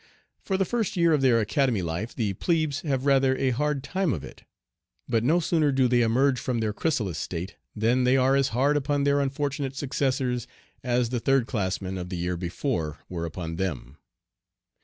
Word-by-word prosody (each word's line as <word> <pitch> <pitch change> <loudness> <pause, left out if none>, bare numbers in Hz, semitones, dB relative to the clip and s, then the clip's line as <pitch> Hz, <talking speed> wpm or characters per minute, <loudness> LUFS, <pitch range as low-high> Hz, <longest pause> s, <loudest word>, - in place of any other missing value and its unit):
For 190 - -1
the 195 - +1
first 220 -2 -2
year 170 -1 +4
of 150 - +2
their 125 -4 +4
Academy 115 - +1
life 85 +8 -4
the 105 -4 -1
'plebes' 155 - 0
have 135 -3 -1
rather 135 -1 +3
a 130 - +1
hard 145 +2 -1
time 185 -1 0
of 75 - -5
it; - - -12 0.6
but 115 -1 +1
no 160 +8 +3
sooner 155 -3 +2
do 130 -1 +3
they 120 0 +3
emerge 125 +3 +2
from 125 -2 -2
their 110 -2 -1
chrysalis 105 - -1
state 90 +2 -5 0.2
than 115 +4 +2
they 125 +2 +4
are 130 +1 +3
as 135 -1 +3
hard 140 +6 +2
upon 145 0 0
their 140 0 +3
unfortunate 140 0 -2
successors 130 -3 -1 0.4
as 120 -1 +1
the 125 0 -1
third 135 0 +2
class 100 -7 -2
men 95 0 -4
of 90 0 -6
the 90 - -4
year 90 +1 -1
before 85 - -3
were 85 -2 -3
upon 80 0 -5
them. 75 -7 -4
130 Hz, 195 wpm, -26 LUFS, 105-140 Hz, 0.6 s, year